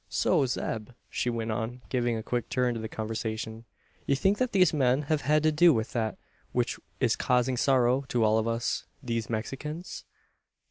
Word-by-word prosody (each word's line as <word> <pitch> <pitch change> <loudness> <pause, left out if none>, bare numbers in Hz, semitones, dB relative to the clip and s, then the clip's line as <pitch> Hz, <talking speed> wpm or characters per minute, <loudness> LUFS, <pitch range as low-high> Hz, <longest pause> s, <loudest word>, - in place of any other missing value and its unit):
"So, 150 -7 +2
Zeb," 110 -3 -3 0.2
she 125 - 0
went 115 -1 -2
on, 120 +3 -4
giving 120 -2 0
a 110 - -5
quick 120 -1 -2
turn 125 -1 +1
to 115 - -4
the 110 0 -5
conversation, 110 0 -4 0.4
"you 140 - +3
think 195 +9 +2
that 255 -1 +1
these 185 -4 +4
men 135 -1 +2
have 150 0 0
had 150 +1 +2
to 155 - +4
do 160 0 +6
with 110 +1 -2
that 110 -3 -1 0.4
which - - 0 0.2
is - - +2
causing 125 +1 +1
sorrow 130 +1 +3
to 120 -4 +1
all 110 0 +4
of 110 - -1
us, 115 -3 -1 0.2
these 115 -3 -2
Mexicans?" 140 +9 -5
125 Hz, 185 wpm, -28 LUFS, 115-140 Hz, 0.4 s, do